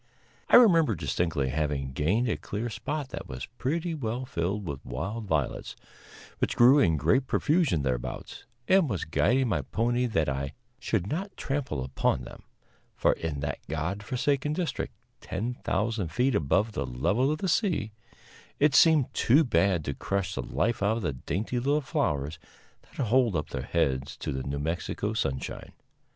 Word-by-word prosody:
I -, -, +7 dB
remember 165 Hz, -, +6 dB
distinctly 80 Hz, -9 st, -1 dB
having 70 Hz, -1 st, -1 dB
gained 100 Hz, -, +1 dB
a 110 Hz, -, +1 dB
clear 110 Hz, +4 st, -4 dB
spot 135 Hz, +7 st, -4 dB
that -, -, -7 dB
was 65 Hz, 0 st, -5 dB
pretty 165 Hz, +5 st, -1 dB
well 125 Hz, -3 st, -3 dB
filled 100 Hz, -2 st, -2 dB
with 70 Hz, -5 st, -5 dB
wild 95 Hz, -, -4 dB
violets, 80 Hz, -8 st, -1 dB, 0.6 s
which -, -, 0 dB
grew 130 Hz, +4 st, +7 dB
in 80 Hz, -, +3 dB
great 130 Hz, -, +2 dB
profusion 145 Hz, -, +2 dB
thereabouts, 60 Hz, -3 st, -4 dB, 0.2 s
and 190 Hz, -5 st, +4 dB
was 100 Hz, -6 st, -2 dB
guiding 115 Hz, -, +2 dB
my 100 Hz, -, +1 dB
pony 120 Hz, +2 st, 0 dB
that 80 Hz, -9 st, 0 dB
I 70 Hz, +1 st, -2 dB, 0.3 s
should 110 Hz, -8 st, -1 dB
not 185 Hz, -, -4 dB
trample 130 Hz, -, -2 dB
upon 65 Hz, -1 st, 0 dB
them; -, -, -11 dB, 0.5 s
for -, -, +3 dB
in 75 Hz, -4 st, -4 dB
that 70 Hz, -1 st, -3 dB
God 80 Hz, +6 st, -2 dB
forsaken 140 Hz, +6 st, 0 dB
district, 165 Hz, -4 st, -3 dB, 0.3 s
10,000 110 Hz, -1 st, -2 dB
feet 125 Hz, +10 st, +1 dB
above 105 Hz, +4 st, +2 dB
the 105 Hz, -, -3 dB
level 105 Hz, -, +1 dB
of 155 Hz, -, -1 dB
the 190 Hz, -, -2 dB
sea, 170 Hz, -, +1 dB, 0.7 s
it 150 Hz, -1 st, +3 dB
seemed 155 Hz, -2 st, +5 dB
too 140 Hz, +7 st, +4 dB
bad 95 Hz, -, +2 dB
to 70 Hz, -, -2 dB
crush 100 Hz, +5 st, -2 dB
the -, -, -2 dB
life 115 Hz, -2 st, -1 dB
out 105 Hz, +3 st, +2 dB
of 115 Hz, -, -4 dB
the 85 Hz, -, -1 dB
dainty 95 Hz, -, -3 dB
little 140 Hz, +4 st, +2 dB
flowers 75 Hz, -, -1 dB, 0.4 s
that -, -, -5 dB
hold 120 Hz, -3 st, +3 dB
up 75 Hz, -, -2 dB
their 65 Hz, -, -3 dB
heads 70 Hz, -2 st, -1 dB
to -, -, -4 dB
the 65 Hz, -, -3 dB
New 70 Hz, +2 st, -3 dB
Mexico 80 Hz, +4 st, -2 dB
sunshine. 65 Hz, -1 st, -3 dB
105 Hz, 165 wpm, -28 LUFS, -, 0.7 s, I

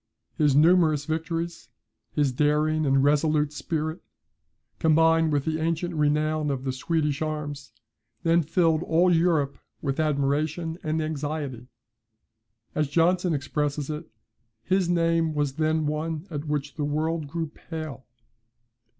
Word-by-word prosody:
His 145 Hz, -3 st, +3 dB
numerous 155 Hz, -2 st, +4 dB
victories, 165 Hz, +2 st, -3 dB, 0.4 s
his 145 Hz, -3 st, +1 dB
daring 150 Hz, +3 st, +1 dB
and 135 Hz, 0 st, +3 dB
resolute 150 Hz, +1 st, +2 dB
spirit, 160 Hz, +1 st, -3 dB, 0.8 s
combined 160 Hz, 0 st, +4 dB
with 145 Hz, -2 st, 0 dB
the 160 Hz, 0 st, -1 dB
ancient 165 Hz, +2 st, -1 dB
renown 150 Hz, 0 st, +1 dB
of 135 Hz, -2 st, -2 dB
the 135 Hz, -, -1 dB
Swedish 150 Hz, +2 st, -1 dB
arms, 150 Hz, -2 st, -4 dB, 0.5 s
then 170 Hz, 0 st, +4 dB
filled 160 Hz, 0 st, +2 dB
all 175 Hz, +2 st, +3 dB
Europe 160 Hz, -5 st, +1 dB, 0.2 s
with 135 Hz, -1 st, -2 dB
admiration 155 Hz, +3 st, 0 dB
and 155 Hz, +1 st, -1 dB
anxiety. 145 Hz, -5 st, -4 dB, 1.1 s
As 150 Hz, -1 st, 0 dB
Johnson 170 Hz, +2 st, +2 dB
expresses 145 Hz, +1 st, -2 dB
it, 155 Hz, +2 st, -6 dB, 0.5 s
his 185 Hz, +2 st, +1 dB
name 165 Hz, -2 st, +2 dB
was 145 Hz, -1 st, -1 dB
then 155 Hz, 0 st, +1 dB
one 155 Hz, +2 st, -2 dB
at 145 Hz, -1 st, -4 dB
which 145 Hz, -1 st, -2 dB
the 150 Hz, -, -3 dB
world 155 Hz, +1 st, -1 dB
grew 165 Hz, +1 st, -3 dB
pale. 155 Hz, -5 st, -7 dB
155 Hz, 125 wpm, -26 LUFS, 145-165 Hz, 1.1 s, numerous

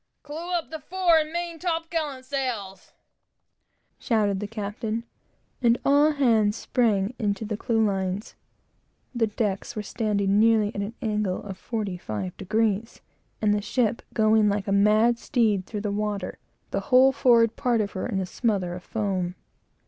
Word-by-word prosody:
"Clew 320 Hz, +5 st, -6 dB
up 335 Hz, -2 st, -3 dB
the 315 Hz, -, -5 dB
fore 350 Hz, 0 st, +3 dB
and 310 Hz, 0 st, -2 dB
main 340 Hz, -1 st, -4 dB
top 330 Hz, -2 st, -2 dB
gallant 295 Hz, -6 st, -3 dB
sails!" 245 Hz, -9 st, -4 dB, 1.1 s
shouted 210 Hz, -5 st, +1 dB
the 210 Hz, -, -4 dB
captain, 215 Hz, +1 st, -4 dB, 0.6 s
and 235 Hz, -1 st, +4 dB
all 290 Hz, +2 st, +5 dB
hands 225 Hz, -7 st, +3 dB
sprang 220 Hz, -4 st, +1 dB, 0.2 s
to 220 Hz, -, -6 dB
the 210 Hz, 0 st, -3 dB
clewlines. 205 Hz, -3 st, -1 dB, 0.8 s
The 235 Hz, -2 st, +1 dB
decks 205 Hz, -2 st, -2 dB
were 215 Hz, -, -3 dB
standing 205 Hz, -2 st, 0 dB
nearly 220 Hz, -1 st, +4 dB
at 200 Hz, -, -3 dB
an 205 Hz, +3 st, -5 dB
angle 210 Hz, -4 st, -1 dB
of 195 Hz, -2 st, -6 dB
forty 210 Hz, -6 st, -3 dB
five 105 Hz, -, -5 dB
degrees, 215 Hz, +2 st, -1 dB, 0.4 s
and 210 Hz, -1 st, +4 dB
the 210 Hz, -, 0 dB
ship 230 Hz, +2 st, 0 dB
going 215 Hz, -1 st, +4 dB
like 200 Hz, 0 st, -1 dB
a -, -, 0 dB
mad 215 Hz, +4 st, +4 dB
steed 215 Hz, -8 st, +1 dB
through 210 Hz, -2 st, -4 dB
the 205 Hz, -1 st, -2 dB
water, 205 Hz, 0 st, -3 dB, 0.3 s
the -, -, 0 dB
whole 260 Hz, +1 st, +7 dB
forward 235 Hz, -4 st, +4 dB
part 240 Hz, -2 st, +1 dB
of 205 Hz, -2 st, -1 dB
her 185 Hz, -, -3 dB
in 205 Hz, -6 st, -1 dB
a 190 Hz, -, -1 dB
smother 190 Hz, -3 st, -1 dB
of 180 Hz, -, -7 dB
foam. 190 Hz, -5 st, -2 dB
215 Hz, 160 wpm, -25 LUFS, 200-250 Hz, 1.1 s, whole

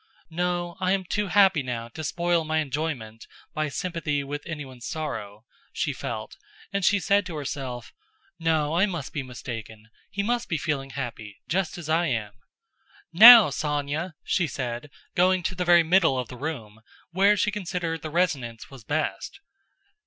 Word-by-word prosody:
"No, 175 Hz, 0 st, -2 dB
I 185 Hz, 0 st, +1 dB
am 195 Hz, -1 st, 0 dB
too 205 Hz, +3 st, -2 dB
happy 190 Hz, -3 st, +4 dB
now 120 Hz, -3 st, -4 dB
to 155 Hz, +7 st, -8 dB
spoil 170 Hz, +2 st, 0 dB
my 160 Hz, 0 st, -1 dB
enjoyment 135 Hz, -7 st, -3 dB, 0.3 s
by 155 Hz, -1 st, -1 dB
sympathy 160 Hz, -4 st, -2 dB
with 145 Hz, +1 st, -5 dB
anyone's 135 Hz, -7 st, -7 dB
sorrow," 110 Hz, -9 st, -5 dB, 0.3 s
she -, -, -2 dB
felt, -, -, -6 dB, 0.4 s
and 200 Hz, -1 st, -1 dB
she 205 Hz, +3 st, +4 dB
said 200 Hz, +3 st, +2 dB
to 170 Hz, -, -6 dB
herself: 130 Hz, -4 st, -5 dB, 0.5 s
"No, 160 Hz, -2 st, +1 dB
I 185 Hz, +5 st, +3 dB
must 170 Hz, -8 st, -5 dB
be 145 Hz, -, -2 dB
mistaken, 115 Hz, -4 st, -8 dB, 0.2 s
he 200 Hz, +1 st, -2 dB
must 240 Hz, +2 st, -1 dB
be 165 Hz, -, 0 dB
feeling 145 Hz, -3 st, -2 dB
happy, 115 Hz, -6 st, -6 dB
just 180 Hz, +3 st, -1 dB
as 170 Hz, -3 st, -8 dB
I 165 Hz, +2 st, +2 dB
am." 110 Hz, -6 st, -2 dB, 0.8 s
"Now, 225 Hz, +1 st, +11 dB
Sónya!" 150 Hz, +4 st, -2 dB
she 175 Hz, -3 st, +1 dB
said, 125 Hz, 0 st, -5 dB, 0.2 s
going 185 Hz, 0 st, +3 dB
to 180 Hz, -, -1 dB
the 180 Hz, 0 st, -3 dB
very 175 Hz, -1 st, +6 dB
middle 165 Hz, -4 st, +3 dB
of 125 Hz, -2 st, -3 dB
the 125 Hz, -, -8 dB
room, 120 Hz, -6 st, -6 dB, 0.3 s
where 200 Hz, +4 st, +4 dB
she 210 Hz, +1 st, +1 dB
considered 180 Hz, -5 st, -3 dB
the 155 Hz, -, -5 dB
resonance 140 Hz, -10 st, -1 dB
was 135 Hz, -4 st, -12 dB
best. 150 Hz, +7 st, -3 dB
155 Hz, 165 wpm, -26 LUFS, 130-180 Hz, 0.8 s, Now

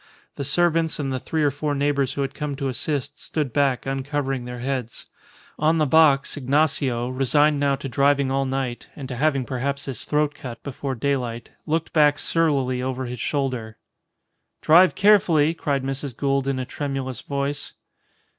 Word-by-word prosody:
The 140 Hz, -, -4 dB
servants 165 Hz, +3 st, +1 dB
and 135 Hz, -3 st, -2 dB
the 130 Hz, -, -2 dB
three 160 Hz, +4 st, -1 dB
or 145 Hz, -, +3 dB
four 145 Hz, +1 st, -2 dB
neighbours 140 Hz, -2 st, +1 dB
who 140 Hz, -, -1 dB
had 135 Hz, 0 st, -4 dB
come 150 Hz, -1 st, -4 dB
to 135 Hz, 0 st, -3 dB
assist, 135 Hz, +2 st, -3 dB
stood 150 Hz, -6 st, -3 dB
back, 140 Hz, -3 st, +1 dB
uncovering 135 Hz, -1 st, -2 dB
their 125 Hz, 0 st, -6 dB
heads. 125 Hz, -2 st, -4 dB, 0.5 s
On 155 Hz, +2 st, +3 dB
the 155 Hz, -, +3 dB
box, 145 Hz, -2 st, +4 dB
Ignacio, 135 Hz, -3 st, +1 dB
resigned 145 Hz, +3 st, +2 dB
now 140 Hz, -1 st, +2 dB
to 135 Hz, -, -6 dB
driving 140 Hz, +1 st, +2 dB
all 135 Hz, 0 st, +1 dB
night 130 Hz, -2 st, -3 dB
(and 140 Hz, -3 st, -7 dB
to 130 Hz, -, -4 dB
having 140 Hz, -1 st, +1 dB
perhaps 140 Hz, +3 st, -3 dB
his 135 Hz, -3 st, -4 dB
throat 150 Hz, 0 st, +1 dB
cut 125 Hz, -4 st, -9 dB
before 135 Hz, -1 st, -4 dB
daylight) 120 Hz, -3 st, -2 dB, 0.2 s
looked 160 Hz, +1 st, -1 dB
back 150 Hz, -2 st, +4 dB
surlily 135 Hz, -6 st, +1 dB
over 130 Hz, 0 st, -3 dB
his 125 Hz, -1 st, -6 dB
shoulder. 125 Hz, -6 st, -2 dB, 0.9 s
"Drive 175 Hz, +4 st, +6 dB
carefully," 185 Hz, -7 st, +4 dB
cried 140 Hz, -5 st, -1 dB
Mrs. 135 Hz, -1 st, -4 dB
Gould 140 Hz, -1 st, 0 dB
in 135 Hz, -1 st, 0 dB
a 130 Hz, -, -3 dB
tremulous 135 Hz, -3 st, -4 dB
voice. 140 Hz, 0 st, -3 dB
140 Hz, 170 wpm, -23 LUFS, 130-150 Hz, 0.9 s, Drive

